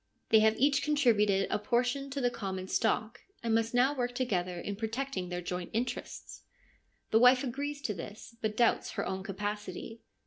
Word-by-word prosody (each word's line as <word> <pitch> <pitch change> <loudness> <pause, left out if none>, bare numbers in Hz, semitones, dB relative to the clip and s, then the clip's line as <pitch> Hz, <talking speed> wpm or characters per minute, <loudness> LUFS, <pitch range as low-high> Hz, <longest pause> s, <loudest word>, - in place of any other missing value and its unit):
They 220 - +7
have 220 0 +4
each 280 +1 +3
contributed 220 -10 +3
a - - +1
portion 245 +5 0
to 280 +1 -3
the 245 -2 +1
common 190 -4 -4
stock, 225 +2 0 0.2
and 230 -1 +1
must 225 0 +2
now 260 +3 +4
work 245 -3 -2
together 180 -8 -1
in 200 - -4
protecting 225 -3 -3
their 175 0 -4
joint 180 0 -4
interests. 240 +3 -4 0.7
The 220 - +5
wife 250 +2 +6
agrees 285 +3 -4
to 210 - -1
this, 205 +6 -9
but 215 -1 -2
doubts 235 -1 +2
her 200 - -2
own 190 0 -3
capacity. 205 +2 -5
225 Hz, 175 wpm, -31 LUFS, 200-250 Hz, 0.7 s, They